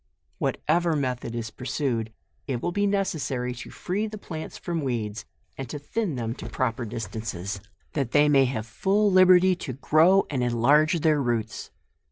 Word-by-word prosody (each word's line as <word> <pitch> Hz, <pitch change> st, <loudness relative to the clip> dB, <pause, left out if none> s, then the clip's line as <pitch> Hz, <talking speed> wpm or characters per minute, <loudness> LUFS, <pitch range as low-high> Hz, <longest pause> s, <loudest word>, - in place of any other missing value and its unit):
"Whatever 170 Hz, +1 st, +1 dB
method 125 Hz, -4 st, -2 dB
is 115 Hz, -1 st, -4 dB
pur»ued, 125 Hz, -3 st, -2 dB, 0.4 s
it 130 Hz, -4 st, -1 dB
will 175 Hz, -, -2 dB
be 205 Hz, +3 st, +1 dB
necessary 140 Hz, -11 st, -1 dB
to 125 Hz, -, -9 dB
free 205 Hz, +4 st, -2 dB
the 215 Hz, 0 st, -7 dB
plants 160 Hz, -6 st, -7 dB
from 170 Hz, -2 st, -3 dB
weeds, 115 Hz, -6 st, -3 dB, 0.3 s
and 135 Hz, -3 st, -5 dB
to 150 Hz, -, -4 dB
thin 170 Hz, +3 st, -2 dB
them 115 Hz, -2 st, -2 dB
to -, -, -7 dB
proper 120 Hz, -2 st, -1 dB
distances, 105 Hz, -3 st, -5 dB, 0.3 s
that 135 Hz, -5 st, -1 dB
they 145 Hz, 0 st, +5 dB
may 140 Hz, -2 st, +5 dB
have 125 Hz, -4 st, -3 dB
full 200 Hz, -, +1 dB
liberty 185 Hz, 0 st, +6 dB
to 130 Hz, -, -5 dB
grow 160 Hz, +8 st, +4 dB
and 130 Hz, -3 st, -1 dB
enlarge 145 Hz, +8 st, +3 dB
their 155 Hz, -2 st, +3 dB
roots. 115 Hz, -3 st, -2 dB
135 Hz, 165 wpm, -26 LUFS, 120-170 Hz, 0.4 s, liberty